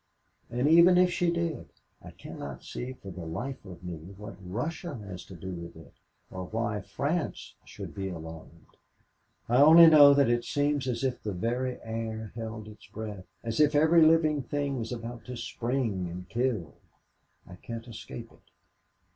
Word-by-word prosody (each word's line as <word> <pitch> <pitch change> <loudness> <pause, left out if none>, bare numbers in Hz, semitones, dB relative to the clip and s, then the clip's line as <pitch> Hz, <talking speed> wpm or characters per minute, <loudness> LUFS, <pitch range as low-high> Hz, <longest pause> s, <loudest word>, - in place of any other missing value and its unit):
And 125 +4 0
even 170 +3 +7
if 180 0 +5
she 175 0 +1
did, 170 -1 -2 0.3
I - - -10
cannot 70 -2 -9
see 125 +1 -6
for 100 -6 -10
the 85 -1 -8
life 110 +12 -5
of 90 -2 -11
me 90 -2 -5 0.2
what 105 +2 -8
Russia 145 - -4
has 100 -5 -8
to 95 - -11
do 95 +3 -7
with 85 -1 -7
it 80 -3 -14 0.4
or 95 0 -5
why 110 0 -2
France 150 - -3
should - - -9
be 95 -1 -4
alarmed. 80 -1 -10 0.7
"I 120 - +3
only 160 +4 +9
know 145 -3 +9
that 140 -1 +4
it 120 0 +2
seems 145 -1 0
as 120 0 -2
if 130 -2 -1
the 105 - -3
very 120 +7 -2
air 110 -1 -4
held 110 -2 -6
its 105 0 -13
breath, 105 -4 -7 0.2
as 115 +2 -3
if 150 0 +4
every 160 +3 +5
living 155 -2 +5
thing 140 -1 -2
was 115 +1 -4
about 120 0 -6
to 125 -1 -6
spring 115 -5 -2
and 90 +1 -8
kill 115 - -1 0.7
I 90 - -12
can't 115 +4 -7
escape 115 0 -9
it. - - -21
115 Hz, 170 wpm, -29 LUFS, 95-145 Hz, 0.7 s, only